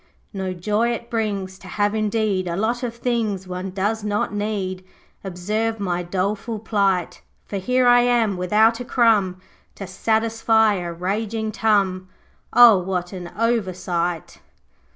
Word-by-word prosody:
No 190 -2 -3
joy 210 +6 0
it 235 0 -7
brings 200 -4 -2
To - - -13
have 205 0 0
indeed 215 -3 0
A 170 - -2
lot 225 +5 -1
of 240 -2 -4
things 225 -6 -2
One 180 +1 -5
does 205 +3 -2
not 210 0 -1
need. 200 -3 -3 0.4
Observe 210 +5 -2
my 180 -3 -1
doleful 200 +5 -2
plight. 200 -4 0 0.2
For 200 - -5
here 250 +6 +1
am 245 -2 +4
I - - -4
without 215 +6 +3
a - - -4
crumb 215 -7 +2 0.4
To 195 - -7
satisfy 220 +2 +2
a 175 -3 -4
raging 215 +5 -2
tum 195 -4 +1 0.4
O 235 -5 +8
what 180 0 -3
an 180 -2 -7
oversight!' 185 -7 -1
205 Hz, 140 wpm, -22 LUFS, 185-225 Hz, 0.4 s, O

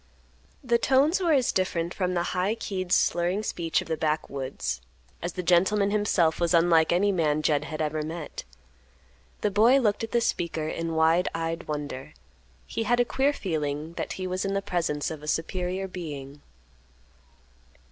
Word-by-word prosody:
The 235 -2 +2
tones 280 - +3
were 345 -3 +2
as 260 -4 +3
different 175 -2 -1
from 180 -2 -1
the 175 - +1
high 190 +4 +1
keyed, 185 -5 -4
slurring 175 +5 +2
speech 165 -5 -1
of - - -16
the 160 - -1
backwoods, 135 - -2 0.4
as 175 0 -3
the 180 - -4
gentleman 190 +4 +3
himself 200 -6 +2
was 170 0 +2
unlike 165 -1 +4
any 195 +4 +3
man 155 -4 +1
Jed 150 -1 +2
had 155 0 -3
ever 155 0 -1
met. 160 0 -6 1.0
The 210 - +1
boy 225 +7 +5
looked 215 -4 +1
at 225 - -3
the 240 - +3
speaker 165 -8 -1
in 165 +1 -3
wide 160 +3 +3
eyed 165 +1 -3
wonder; 145 -3 -5 0.5
he - - -4
had 240 +2 +2
a 245 - +4
queer 270 +4 +2
feeling 155 - -3
that - - -4
he 185 - -5
was 185 0 -2
in 195 0 -1
the 195 - +1
presence 165 -5 -1
of 155 -2 -7
a 150 - -10
superior 180 +4 -2
being. 145 -6 -7
175 Hz, 170 wpm, -27 LUFS, 155-200 Hz, 1.0 s, boy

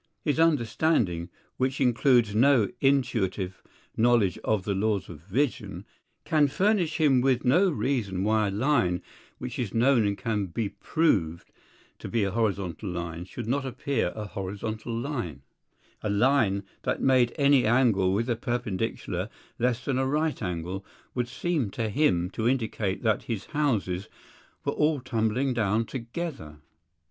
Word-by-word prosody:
His 150 +1 0
understanding, 120 - +2 0.3
which 130 +1 0
includes 120 -3 +3
no 120 -2 +4
intuitive 105 -9 0 0.3
knowledge 115 -6 +3
of 110 -3 +1
the 100 - -1
laws 100 0 0
of 85 -4 -9
vision, 115 - -2 0.4
can 150 -2 +3
furnish 180 +1 +1
him 140 -6 +4
with 130 -1 +1
no 180 +10 +4
reason 120 - -1
why 110 0 +2
a - - 0
line 100 -5 +1 0.3
which - - -6
is 115 -5 -3
known 120 -2 +4
and 100 -1 -1
can 105 -5 -1
be 100 +4 -2
proved 85 - 0 0.5
to - - -7
be 115 -3 +1
a 100 - 0
horizontal 100 -3 -1
line, 85 -1 -5
should 95 - -7
not 140 +4 0
appear 130 -6 -1
a 110 -1 -5
horizontal 105 +4 -5
line; 115 - -4 0.6
a 105 - -2
line 105 -2 +2 0.2
that - - -1
made 130 -3 +4
any 140 -4 +4
angle 110 -6 +3
with 105 +4 +1
the 120 -1 0
perpendicular 120 -5 -3 0.3
less 125 0 0
than 135 -3 0
a 130 - +1
right 150 +1 0
angle, 90 0 -3 0.3
would 120 -1 -1
seem 150 - -1
to 110 +2 -3
him 100 - +2
to 115 +3 0
indicate 110 -6 -1
that 110 -2 +2
his 115 -5 -3
houses 105 - 0 0.6
were - - 0
all 150 -1 +2
tumbling 125 +1 0
down 110 -1 +1
together. 120 - -6
115 Hz, 150 wpm, -27 LUFS, 100-135 Hz, 0.6 s, no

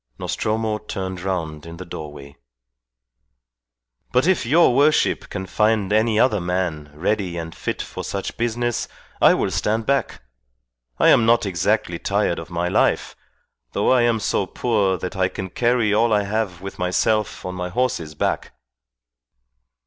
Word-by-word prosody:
Nostromo 110 0 -1
turned 95 -3 -5
round 85 -5 -3
in 85 0 -9
the 90 - -8
doorway. 75 -4 -9 1.8
"But 125 +3 +3
if 185 -9 +2
your 160 0 +5
worship 145 +4 +2
can 95 -1 -5
find 105 +1 +1
any 110 0 +3
other 110 -6 +3
man 85 -4 -2
ready 90 +1 -1
and 80 -1 -5
fit - - -4
for - - -7
such 100 -1 -4
business 120 0 -1 0.3
I - - +7
will - - -1
stand 110 +1 0
back. 140 - -1 0.7
I - - +5
am 115 - +5
not 115 -1 +4
exactly 90 -4 0
tired - - 0
of - - -9
my 85 0 -1
life, - - +1 0.6
though - - +2
I 130 -1 +5
am 120 -1 +2
so 100 -2 0
poor 100 -6 0
that 90 - -5
I 95 -1 +2
can 95 0 -6
carry 120 -2 +2
all 115 +2 +3
I 105 -1 +3
have 100 -3 -2
with 95 0 -8
myself 95 +4 0
on 90 - -4
my 90 0 -4
horse's 90 -8 -1
back." - - -2
100 Hz, 155 wpm, -22 LUFS, 90-115 Hz, 1.8 s, I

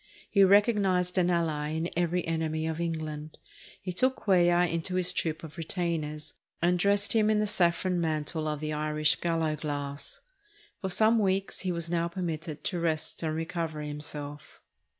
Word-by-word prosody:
He 200 -2 +6
recognized 195 -3 +4
an 180 0 +3
ally 160 -4 0
in 160 +1 -1
every 175 +1 0
enemy 160 -1 -1
of 160 +1 -2
England. 155 -2 -4 0.4
He 185 -2 -5
took 255 +8 +2
Cuellar 175 -2 +3
into 170 +2 -2
his 185 -1 +2
troop 160 -1 -2
of 160 +1 -9
retainers, 160 -3 -3 0.3
and 175 +1 +2
dressed 200 +2 +3
him 215 -1 +3
in 215 - +3
the 210 - +2
saffron 180 -2 +1
mantle 155 0 -1
of 150 -1 -2
the 155 0 -2
Irish 150 0 +1
gallowglass. 150 -4 -2 0.6
For 190 - -2
some 220 +5 +4
weeks 195 -1 0
he 185 - -1
was 170 -1 0
now 170 0 0
permitted 165 -3 -4
to 180 - -1
rest 160 -2 -2
and 155 -1 -1
recover 165 -1 -3
him 150 0 -5
self. 145 -1 -7
170 Hz, 165 wpm, -29 LUFS, 155-180 Hz, 0.6 s, He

